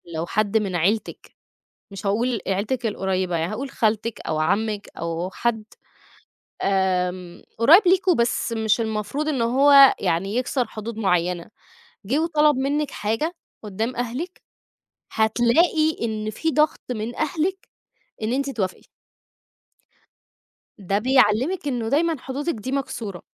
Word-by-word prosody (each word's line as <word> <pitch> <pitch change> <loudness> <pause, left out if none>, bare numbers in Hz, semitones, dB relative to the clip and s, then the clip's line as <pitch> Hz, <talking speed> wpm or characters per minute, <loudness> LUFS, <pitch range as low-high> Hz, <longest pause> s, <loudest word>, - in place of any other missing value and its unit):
لو 160 +1 -2
حد 215 +3 0
من 200 -4 -1
عيلتِك، 195 +6 -1 0.6
مش 195 0 -7
هاقول 230 +3 0
عيلتِك 215 +6 -1
القريبة، 190 -4 -1
يعني 165 +4 -2
هاقول 265 +5 -5
خالتِك 220 0 -1
أو 155 - -3
عمِك 205 +5 -1
أو 170 +2 -3
حد 225 +2 -2 1.0
آمم 180 -2 -1 0.2
قريب 300 - +7
ليكم 370 0 +4
بس 235 0 0
مش 220 0 +1
المفروض 220 +7 -2
إن 280 -6 0
هو 275 +3 +7
يعني 195 +6 -1
يكسر 250 0 0
حدود 220 +1 -7
معينة، 180 -4 0 0.6
جِه 260 +8 +1
وطلب 305 -3 +3
منِك 285 +2 -1
حاجة 225 +11 -2 0.3
قُدّام 220 +4 -3
أهلِك، 250 +10 -4 0.7
هتلاقي 245 +9 +2
إن 215 -2 -2
في 320 +9 -2
ضغط 305 +1 +2
من 230 0 -4
أهلِك 330 +5 -2 0.6
إن 215 +2 -1
أنتِ 275 +2 -1
توافقي. 195 -7 -4 1.9
ده 200 +1 -1
بيعلّمِك 260 - +2
إنه 240 -5 -2
دايمًا 325 +5 +2
حدودِك 280 +6 -3
دي 240 +3 -6
مكسورة. 230 -9 -4
225 Hz, 125 wpm, -23 LUFS, 200-275 Hz, 1.9 s, قريب